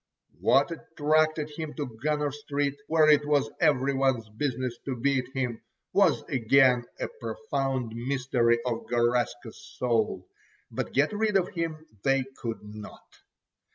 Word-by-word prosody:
What 140 Hz, +5 st, +3 dB
attracted 155 Hz, -1 st, 0 dB
him 155 Hz, -2 st, -5 dB
to 135 Hz, -7 st, -5 dB
Gunner 150 Hz, 0 st, 0 dB
Street, 145 Hz, -1 st, -2 dB
where 160 Hz, -1 st, +4 dB
it 150 Hz, -1 st, +6 dB
was 145 Hz, -6 st, +1 dB
every 140 Hz, -1 st, +3 dB
one's 135 Hz, -4 st, +1 dB
business 125 Hz, +1 st, -2 dB
to 135 Hz, -, -2 dB
beat 130 Hz, +1 st, +1 dB
him, 125 Hz, -4 st, -2 dB, 0.3 s
was -, -, +4 dB
again 125 Hz, 0 st, +3 dB
a -, -, -1 dB
profound 135 Hz, -, -2 dB
mystery 125 Hz, -1 st, +1 dB
of 120 Hz, -2 st, -2 dB
Garaska's 120 Hz, -1 st, 0 dB
soul, 110 Hz, -7 st, 0 dB, 0.4 s
but -, -, -4 dB
get 145 Hz, +8 st, +2 dB
rid 210 Hz, -1 st, +2 dB
of 185 Hz, -1 st, 0 dB
him 165 Hz, -2 st, -4 dB, 0.2 s
they 135 Hz, -1 st, +3 dB, 0.2 s
could 115 Hz, -3 st, -4 dB
not. 105 Hz, 0 st, -10 dB
135 Hz, 135 wpm, -28 LUFS, 120-150 Hz, 0.4 s, it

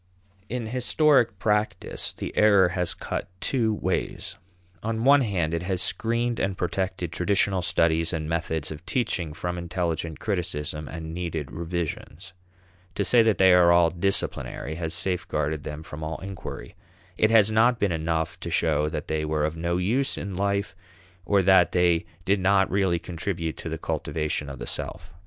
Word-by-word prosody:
In 125 Hz, -1 st, -3 dB
historic 125 Hz, 0 st, +3 dB
practice 105 Hz, +1 st, -1 dB
the -, -, -7 dB
error 100 Hz, -4 st, +5 dB
has 90 Hz, -1 st, -1 dB
cut -, -, -4 dB
two 115 Hz, -1 st, +1 dB
ways. 105 Hz, -, -2 dB, 0.5 s
On 110 Hz, +1 st, -2 dB
one 140 Hz, +2 st, +6 dB
hand, 90 Hz, -9 st, 0 dB
it 85 Hz, -, -1 dB
has 90 Hz, 0 st, -2 dB
screened 115 Hz, +4 st, 0 dB
and 95 Hz, -1 st, -1 dB
protected 90 Hz, -1 st, -2 dB
traditional 95 Hz, +2 st, +1 dB
studies 85 Hz, -1 st, +2 dB
and 80 Hz, -3 st, -3 dB
methods 80 Hz, -2 st, -2 dB
of 80 Hz, +1 st, -8 dB
teaching 95 Hz, -10 st, -1 dB
from 90 Hz, +3 st, -4 dB
intelligent 85 Hz, -2 st, -3 dB
criticism 80 Hz, -6 st, -3 dB
and 80 Hz, +3 st, -7 dB
needed 80 Hz, -5 st, -4 dB
revisions. 85 Hz, +1 st, -5 dB, 0.6 s
To 100 Hz, -, 0 dB
say 120 Hz, +3 st, +6 dB
that 110 Hz, -2 st, +3 dB
they 95 Hz, -1 st, +6 dB
are 85 Hz, -1 st, +5 dB
"disciplinary" 85 Hz, -5 st, -2 dB
has 80 Hz, 0 st, -2 dB
safeguarded 80 Hz, -4 st, -1 dB
them 75 Hz, +1 st, -6 dB
from 80 Hz, -2 st, -9 dB
all 80 Hz, +1 st, -3 dB
inquiry. 95 Hz, 0 st, -8 dB, 0.4 s
It 110 Hz, -, +3 dB
has 110 Hz, -2 st, +5 dB
not 115 Hz, +3 st, +4 dB
been 100 Hz, -4 st, +1 dB
enough 80 Hz, 0 st, -1 dB
to -, -, -5 dB
show 75 Hz, -2 st, +1 dB
that -, -, -5 dB
they 80 Hz, 0 st, -1 dB
were 75 Hz, -1 st, 0 dB
of 80 Hz, +1 st, -2 dB
no 85 Hz, +1 st, -1 dB
use 115 Hz, +10 st, 0 dB
in 100 Hz, -1 st, -5 dB
life 100 Hz, +1 st, -1 dB, 0.5 s
or 100 Hz, 0 st, +3 dB
that 95 Hz, -1 st, +5 dB
they 85 Hz, -2 st, +2 dB, 0.2 s
did 100 Hz, +1 st, +2 dB
not 95 Hz, +1 st, +3 dB
really 95 Hz, -2 st, +2 dB
contribute 85 Hz, -1 st, -4 dB
to -, -, -6 dB
the 80 Hz, -, -3 dB
cultivation 80 Hz, -2 st, -2 dB
of 70 Hz, -, -7 dB
the -, -, -6 dB
self. 85 Hz, +2 st, -4 dB
90 Hz, 165 wpm, -25 LUFS, 80-100 Hz, 0.6 s, one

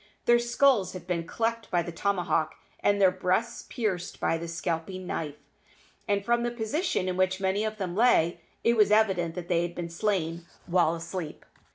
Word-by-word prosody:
Their 240 Hz, 0 st, +5 dB
skulls 240 Hz, -5 st, +3 dB
had 180 Hz, -2 st, -8 dB
been 170 Hz, -2 st, -2 dB
cleft 230 Hz, +2 st, -2 dB
by 175 Hz, -1 st, +1 dB
the 175 Hz, -, -6 dB
tomahawk 170 Hz, -3 st, 0 dB, 0.2 s
and 205 Hz, 0 st, +2 dB
their 190 Hz, -2 st, +6 dB
breasts 185 Hz, +6 st, -1 dB
pierced 190 Hz, -7 st, -3 dB
by 165 Hz, -, +1 dB
the 170 Hz, -, -5 dB
scalping 170 Hz, +2 st, -3 dB
knife, 150 Hz, -4 st, -3 dB, 0.7 s
and 200 Hz, -1 st, 0 dB
from 235 Hz, +1 st, +2 dB
the 240 Hz, -, 0 dB
position 240 Hz, -, -1 dB
in 185 Hz, 0 st, -2 dB
which 185 Hz, 0 st, +1 dB
many 195 Hz, +2 st, 0 dB
of 215 Hz, 0 st, -3 dB
them 185 Hz, -4 st, -3 dB
lay 175 Hz, -7 st, +3 dB, 0.2 s
it 235 Hz, -, +4 dB
was 210 Hz, -2 st, +5 dB
evident 190 Hz, -6 st, +2 dB
that 175 Hz, -1 st, -6 dB
they 170 Hz, -2 st, +2 dB
had 175 Hz, 0 st, -3 dB
been 170 Hz, -1 st, -4 dB
slain 170 Hz, -3 st, -1 dB, 0.2 s
while 170 Hz, -2 st, +2 dB
asleep. 165 Hz, -1 st, -6 dB
185 Hz, 185 wpm, -28 LUFS, 170-215 Hz, 0.7 s, their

